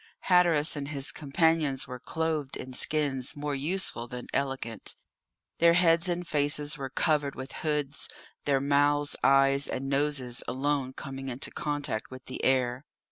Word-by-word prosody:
Hatteras 170 Hz, -5 st, +4 dB
and 140 Hz, -1 st, -4 dB
his 140 Hz, -2 st, -1 dB
companions 150 Hz, -2 st, +1 dB
were 125 Hz, 0 st, -7 dB
clothed 155 Hz, -1 st, -2 dB
in 130 Hz, -, -8 dB
skins 135 Hz, -2 st, 0 dB
more 145 Hz, 0 st, -3 dB
useful 140 Hz, -4 st, -1 dB
than 125 Hz, 0 st, -7 dB
elegant. 135 Hz, -5 st, -2 dB, 0.6 s
Their 170 Hz, 0 st, +6 dB
heads 170 Hz, 0 st, +4 dB
and 175 Hz, 0 st, -2 dB
faces 145 Hz, 0 st, +1 dB
were 135 Hz, -2 st, -5 dB
covered 145 Hz, 0 st, +1 dB
with 130 Hz, +1 st, -7 dB
hoods, 150 Hz, -2 st, 0 dB, 0.4 s
their 140 Hz, -2 st, +3 dB
mouths, 145 Hz, +1 st, +2 dB
eyes, 135 Hz, 0 st, +5 dB
and 135 Hz, +1 st, -3 dB
noses 140 Hz, -4 st, 0 dB
alone 130 Hz, +1 st, -1 dB
coming 135 Hz, 0 st, -6 dB
into 125 Hz, +1 st, -3 dB
contact 145 Hz, -7 st, -3 dB
with 130 Hz, 0 st, -10 dB
the 130 Hz, -, -6 dB
air. 130 Hz, 0 st, +2 dB
140 Hz, 145 wpm, -29 LUFS, 135-150 Hz, 0.6 s, Their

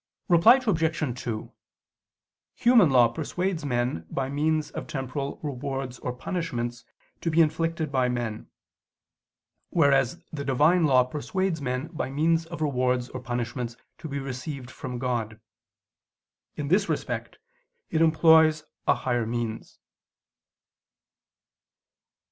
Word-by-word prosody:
Reply 170 Hz, +7 st, +7 dB
Obj. 160 Hz, -, 0 dB
2: 110 Hz, -3 st, -4 dB, 1.0 s
Human 235 Hz, -8 st, +5 dB
law 125 Hz, -3 st, +6 dB
persuades 175 Hz, +7 st, -3 dB
men 120 Hz, -, -1 dB
by 135 Hz, -1 st, -2 dB
means 155 Hz, +2 st, 0 dB
of -, -, -6 dB
temporal 135 Hz, +1 st, -4 dB
rewards 135 Hz, -2 st, -4 dB
or 125 Hz, -, -3 dB
punishments 120 Hz, -4 st, -4 dB, 0.4 s
to 165 Hz, -, -1 dB
be 160 Hz, +1 st, +2 dB
inflicted 165 Hz, -1 st, +1 dB
by 130 Hz, -2 st, +2 dB
men: 120 Hz, -3 st, -3 dB, 1.2 s
whereas 140 Hz, -2 st, +3 dB
the 140 Hz, -2 st, -4 dB
Divine 150 Hz, +6 st, +3 dB
law 130 Hz, -3 st, +5 dB
persuades 165 Hz, +6 st, -2 dB
men 125 Hz, +1 st, -2 dB
by 155 Hz, -6 st, -4 dB
means 165 Hz, +4 st, +1 dB
of 170 Hz, -1 st, -7 dB
rewards 125 Hz, -3 st, 0 dB
or 130 Hz, -, -6 dB
punishments 120 Hz, 0 st, -4 dB, 0.2 s
to 160 Hz, -, -6 dB
be 140 Hz, -, -3 dB
received 135 Hz, -1 st, -6 dB
from 125 Hz, 0 st, -6 dB
God. 120 Hz, -3 st, -2 dB, 1.2 s
In 145 Hz, -1 st, -4 dB
this 195 Hz, +4 st, +3 dB
respect -, -, -3 dB, 0.5 s
it 160 Hz, -, +1 dB
employs 160 Hz, -1 st, +5 dB, 0.2 s
higher 120 Hz, -3 st, +1 dB
means. 115 Hz, -1 st, -4 dB
140 Hz, 115 wpm, -26 LUFS, 125-160 Hz, 1.2 s, Reply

